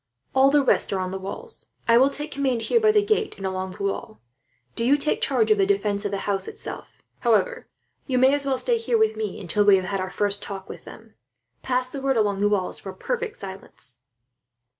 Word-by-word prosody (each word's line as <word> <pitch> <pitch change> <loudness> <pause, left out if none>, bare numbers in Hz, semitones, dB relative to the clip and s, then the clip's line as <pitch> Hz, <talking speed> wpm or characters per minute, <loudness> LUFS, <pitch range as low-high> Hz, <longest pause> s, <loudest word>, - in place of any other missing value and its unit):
All 265 +1 +5
the 290 0 +4
rest - - +2
are 195 - 0
on 185 0 -3
the 190 - -4
walls. 450 - -7 0.2
I 230 0 +6
will 265 +2 +5
take 295 +2 -3
command 260 -5 -1
here 470 - +3
by 435 -1 +4
the 420 -1 +3
gate 430 +1 0
and 195 - -6
along 190 0 -3
the 200 - -7
wall. 195 - -3 0.5
Do 230 - -1
you 275 +5 +4
take 300 +1 0
charge 440 -1 +2
of 425 - +4
the 390 - +4
defence 210 - 0
of - - 0
the 195 0 -3
house, 195 -2 -1
itself. - - -5 0.2
However, 365 - +1 0.4
you 260 -3 0
may 260 +2 +5
as 285 0 +3
well 270 -1 0
stay 470 - +1
here 460 +1 +1
with 440 0 +2
me, 435 -1 -4
until 210 - +1
we 205 -1 +7
have 185 -1 0
had 195 +1 -2
our 185 0 -3
first 200 +1 -1
talk 195 -1 -7
with - - -10
them. - - -13 0.5
Pass 250 0 0
the 270 +1 -7
word 270 -2 +1
along 205 -3 +1
the 205 +1 +3
walls 195 -3 -1
for 195 - -7
perfect 470 - -4
silence." 190 -10 -4
250 Hz, 230 wpm, -24 LUFS, -, 0.5 s, we